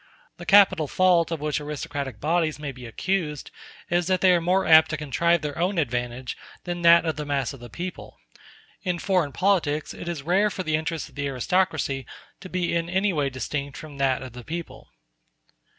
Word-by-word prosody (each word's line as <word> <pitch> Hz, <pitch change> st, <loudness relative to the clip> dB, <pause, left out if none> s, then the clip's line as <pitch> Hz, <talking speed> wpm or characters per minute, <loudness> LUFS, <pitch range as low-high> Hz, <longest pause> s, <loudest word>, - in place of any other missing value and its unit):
The -, -, -10 dB
capital 190 Hz, -6 st, +6 dB
fault 175 Hz, 0 st, +3 dB
of 165 Hz, -2 st, -3 dB
which 150 Hz, 0 st, -1 dB
aristocratic 140 Hz, -4 st, -5 dB
bodies 160 Hz, 0 st, +1 dB
may 150 Hz, -2 st, -5 dB
be 125 Hz, -2 st, -10 dB
accused 155 Hz, +2 st, -2 dB, 0.4 s
is 175 Hz, 0 st, +1 dB
that 185 Hz, -2 st, +1 dB
they 185 Hz, -, +6 dB
are 175 Hz, -, +2 dB
more 185 Hz, +3 st, +2 dB
apt 160 Hz, -1 st, +7 dB
to 155 Hz, -, -2 dB
contrive 155 Hz, +3 st, +1 dB
their 150 Hz, +1 st, -4 dB
own 185 Hz, +3 st, 0 dB
advantage 125 Hz, -3 st, -2 dB, 0.3 s
than 175 Hz, -1 st, -4 dB
that 170 Hz, 0 st, +6 dB
of 160 Hz, -2 st, -1 dB
the 150 Hz, -, -3 dB
mass 140 Hz, -2 st, -1 dB
of 135 Hz, -, -11 dB
the 120 Hz, 0 st, -10 dB
people. 175 Hz, +9 st, -7 dB, 0.6 s
In 180 Hz, -1 st, -1 dB
foreign 180 Hz, -5 st, +1 dB
politics 165 Hz, -4 st, +1 dB
it -, -, -9 dB
is 170 Hz, -5 st, -4 dB
rare 190 Hz, +6 st, +3 dB
for 190 Hz, -, -4 dB
the 155 Hz, -2 st, 0 dB
interest 160 Hz, 0 st, -3 dB
of -, -, -22 dB
the 145 Hz, 0 st, -3 dB
aristocracy 140 Hz, 0 st, 0 dB, 0.3 s
to 185 Hz, -, -10 dB
be 180 Hz, -2 st, -1 dB
in 170 Hz, 0 st, -1 dB
any 190 Hz, +2 st, +1 dB
way 145 Hz, -3 st, 0 dB
distinct 140 Hz, +2 st, -4 dB
from 150 Hz, -3 st, -10 dB
that 135 Hz, -1 st, +1 dB
of 130 Hz, -3 st, -9 dB
the 125 Hz, 0 st, -9 dB
people. 170 Hz, +4 st, -7 dB
160 Hz, 200 wpm, -25 LUFS, 140-175 Hz, 0.6 s, apt